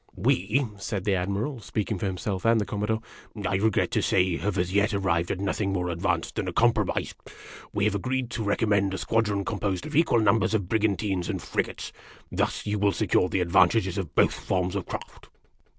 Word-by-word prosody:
" - - -31
We," 105 +10 +1
said 100 -1 -3
the 100 - +1
Admiral, 100 +9 -1
speaking 105 -2 -3
for 100 - -1
himself 95 0 -3
and 115 0 +4
the 105 - -1
Commodore, 105 +2 -1 0.3
" 105 -3 -9
I 95 +1 +1
regret 110 +1 +1
to - - +1
say, 90 -2 +2
have 105 -2 -2
as 90 +1 0
yet 100 +2 +2
arrived 85 -3 0
at 95 - -2
nothing 100 0 -1
more 90 -1 -1
advanced 85 0 -1
than - - -1
a - - -1
compromise. - - +1 0.6
We 100 - 0
have 105 - +2
agreed 125 +4 -2
to 115 - -3
recommend 100 -2 +1
a - - -3
squadron 105 -3 0
composed 100 -4 -2
of 155 - -6
equal 160 -6 +4
numbers 110 0 +3
of 100 -4 -1
brigantines 100 -3 0
and - - -2
frigates. - - -3 0.4
Thus - - -1
you 105 0 -1
will 100 -1 +3
secure 95 -3 +2
the 95 - 0
advantages 95 +2 +3
of 85 -6 -5
both - - +4
forms 90 -1 -1
of - - -3
craft." - - -8
100 Hz, 200 wpm, -26 LUFS, 95-110 Hz, 0.6 s, and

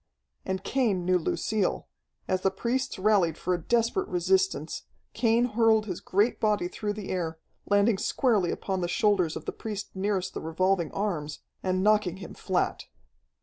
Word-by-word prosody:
And 190 0 -2
Cain 215 -10 0
knew 180 0 +3
Lucille. 200 +4 -1 0.4
As 185 0 0
the 190 - +3
priests 245 +7 -2
rallied 190 -5 +3
for 180 - -1
a 175 - -2
desperate 235 - +1
resistance, 180 -3 0 0.3
Cain 230 +1 +3
hurled 225 -2 +3
his 185 -5 -4
great 205 +5 +1
body 210 -4 +1
through 205 +3 -3
the 205 -2 -7
air, 165 -3 -2 0.3
landing 205 0 +3
squarely 210 -5 +2
upon 190 +1 -2
the 175 - 0
shoulders 185 -4 +2
of - - -6
the - - -2
priest 210 -2 -6
nearest 190 -1 -1
the - - -5
revolving 170 +1 0
arms, 160 -8 -3 0.2
and 185 0 0
knocking 210 -4 +3
him 190 - -9
flat. - - -1
195 Hz, 160 wpm, -28 LUFS, 180-215 Hz, 0.4 s, knew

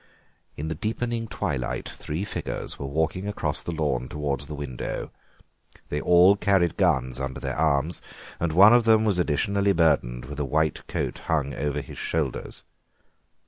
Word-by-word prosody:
In 75 - -4
the 80 - -1
deepening 115 +6 -2
twilight 65 - -3
three 80 +6 -4
figures - - -5
were 70 - -4
walking 80 +7 -1
across 105 - -2
the - - -4
lawn 70 -6 -1
towards 70 -2 -3
the 75 - -6
window; 70 -4 -5 0.8
they 75 - -2
all 90 +5 +6
carried 95 -4 +2
guns 65 -10 +1
under 65 -1 -4
their - - -3
arms, 75 +1 +1 0.4
and 85 0 0
one 100 +7 +8
of 120 -1 +5
them 110 -1 +5
was 100 -4 +1
additionally 100 +5 +2
burdened 70 -8 +2
with 75 0 -7
a - - 0
white 80 +3 0
coat - - -3
hung 70 -3 0
over 75 0 -2
his - - -10
shoulders. 75 -6 -3
80 Hz, 160 wpm, -25 LUFS, 70-95 Hz, 0.8 s, one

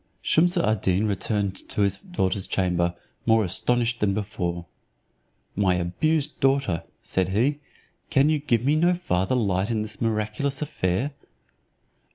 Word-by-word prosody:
Shumse 175 +3 +3
ad 110 - +1
Deen 95 +3 +2
returned 100 -1 -1
to - - -1
his 100 -1 +1
daughter's 100 - -2
chamber, 90 -2 0 0.3
more 110 -1 +5
astonished 120 +6 0
than 100 -2 +1
before. 90 -5 -3 0.9
"My 95 -2 +2
abused 135 - 0
daughter," 135 - +1 0.2
said 95 -1 0
he, 125 +9 +1 0.5
"can 145 -2 +4
you 155 -1 +2
give 120 -5 0
me 145 +2 +3
no 175 +3 +3
farther 95 - 0
light 100 -4 +1
in 110 -2 0
this 110 0 -4
miraculous 115 +5 -1
affair?" 125 -2 -1
105 Hz, 140 wpm, -25 LUFS, 95-140 Hz, 0.9 s, more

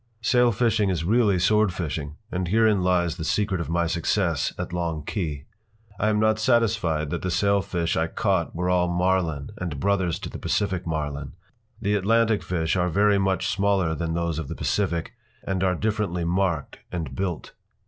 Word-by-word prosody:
p> - - 0
Sailfishing 115 -4 +3
is 85 -4 -1
really 105 +2 +3
swordfishing, 85 -7 0 0.2
and 90 -1 -2
herein 110 0 +3
lies 90 -2 +1
the 80 - -4
secret 95 0 0
of 85 - -5
my 85 +1 +1
success 85 0 0
at - - -5
Long 85 -3 -2
Key. 75 -9 -3 0.6
I 105 - +2
am 105 -1 +2
not 110 0 +2
satisfied 110 - +1
that - - -2
the 90 - -2
sailfish 95 -2 +1
I 80 +1 +1
caught 95 -1 0
were 90 +1 -1
all 90 -1 +2
Marlin 85 -4 0
and 85 -6 -4
brothers 95 -2 +1
to - - -5
the - - -7
Pacific 95 -4 -1
Marlin. 75 -3 -3 0.5
The 100 - 0
Atlantic 110 +2 +2
fish 80 -2 -1
are 90 -1 +1
very 100 +3 +3
much 95 -1 0
smaller 100 -5 +1
than 80 0 -2
those 85 -2 -1
of 80 - -5
the - - -5
Pacific, 90 0 -1 0.3
and 95 -1 -1
are 90 -1 +2
differently 105 -3 -1
marked 85 -3 -1
and 80 -7 -4
built. 90 +2 -3
90 Hz, 175 wpm, -25 LUFS, 85-100 Hz, 0.6 s, Sailfishing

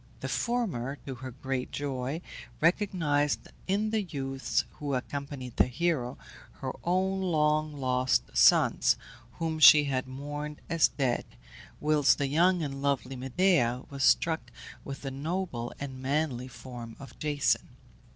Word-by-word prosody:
The - - -3
former, 175 - -1
to 135 - -4
her 130 +1 -7
great 130 0 -4
joy, 140 +2 -3 0.4
recognized 165 -5 +1 0.2
in 205 +3 +1
the 220 -1 +1
youths 135 -7 -2
who 145 -2 -1
accompanied 135 -1 -5
the - - +5
hero 130 -2 -1 0.4
her - - -5
own 190 +2 +1
long 155 -3 +2
lost 125 - +1
sons, - - +5 0.4
whom 160 -1 -3
she 150 -1 +9
had 130 -2 -1
mourned 145 +3 -6
as 165 -1 +5
dead, 130 -4 -1 0.6
whilst 150 -2 +3
the 145 - 0
young 170 +5 +3
and 135 -2 -4
lovely 140 -2 -1
Medea 130 -2 +2
was 140 -1 -3
struck 160 +3 +3 0.3
with 140 0 -7
the 135 - -3
noble 140 -4 -3
and 130 -2 -6
manly 135 -2 -1
form 120 -3 -9
of 140 - -12
Jason. 145 -2 +1
140 Hz, 135 wpm, -29 LUFS, 130-160 Hz, 0.6 s, she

